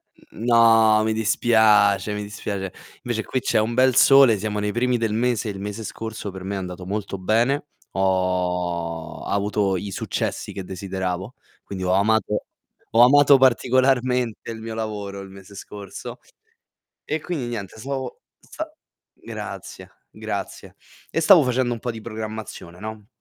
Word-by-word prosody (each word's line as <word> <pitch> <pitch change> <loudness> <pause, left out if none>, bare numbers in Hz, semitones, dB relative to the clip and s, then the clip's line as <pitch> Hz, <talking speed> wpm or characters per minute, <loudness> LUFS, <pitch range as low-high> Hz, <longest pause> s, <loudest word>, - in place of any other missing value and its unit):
N 110 - -12
No, 115 -2 +5
mi 110 0 +1
dispiace, 110 -2 +3
mi 105 0 -3
dispiace. 100 -2 -5 0.3
Invece 115 -2 -2
qui 130 - -2
c'è 120 - +1
un 110 +2 0
bel 130 0 +4
sole, 135 -5 +7
siamo 105 +1 -3
nei 105 0 -1
primi 125 +2 +1
del 115 -2 -1
mese 120 0 0
e - - -2
il 95 - -8
mese 105 +2 -5
scorso 110 0 -6
per 95 0 -9
me 100 +2 -3
è - - -2
andato 90 -1 -6
molto 100 +1 -3
bene. 115 +10 +1 0.2
Ho 90 -3 -1
avuto 100 -1 0
i 100 +2 -5
successi - - -3
che 95 - -5
desideravo, 95 +3 -4 0.3
quindi 95 -2 -6
ho 90 0 +1
amato 105 +2 +2 0.5
ho 115 - +5
amato 140 +2 +7
particolarmente 125 -2 +2
il 115 -1 -6
mio 115 0 -6
lavoro 105 -3 -4
il 95 - -10
mese 100 +1 -13
scorso. 100 0 -8 0.9
E 155 +1 -2
quindi 150 -6 -4
niente 110 -4 -6
stavo 135 - -5 0.2
sa 315 0 -7 0.4
grazie, - - -8 0.2
grazie. - - -6 0.3
E - - 0
stavo 190 -6 +7
facendo 125 -1 +1
un 120 - -3
po' 120 - -3
di 115 -1 -7
programmazione, 110 -5 -7
no. 110 0 -8
110 Hz, 155 wpm, -23 LUFS, 95-120 Hz, 0.9 s, sole